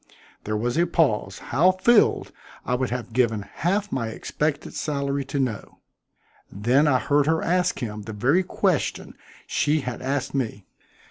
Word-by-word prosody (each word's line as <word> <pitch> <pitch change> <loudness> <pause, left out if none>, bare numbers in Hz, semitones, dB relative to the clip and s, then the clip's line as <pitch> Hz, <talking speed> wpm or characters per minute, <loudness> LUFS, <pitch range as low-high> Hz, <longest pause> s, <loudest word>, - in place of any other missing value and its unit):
There 105 0 -1
was 120 +5 -1
a 175 - +3
pause 110 - +1 0.2
how 180 +6 +5
filled, 215 +4 +3 0.3
I - - -1
would 125 +1 0
have 120 -2 -5
given 115 -4 +1
half 195 - -2
my 115 -3 -1
expected 150 +6 -3
salary 140 -2 -2
to 140 - -4
know. 120 -6 -3 0.7
Then 125 +9 +2
I 135 -3 +4
heard 145 +2 +2
her 160 0 +2
ask 180 +1 +1
him 105 -4 -5
the 110 +1 -7
very 130 - +2
question 185 -3 -1 0.3
she 150 +1 +1
had 125 -2 -5
asked 135 0 -2
me. 115 -7 -3
135 Hz, 155 wpm, -24 LUFS, 115-160 Hz, 0.7 s, how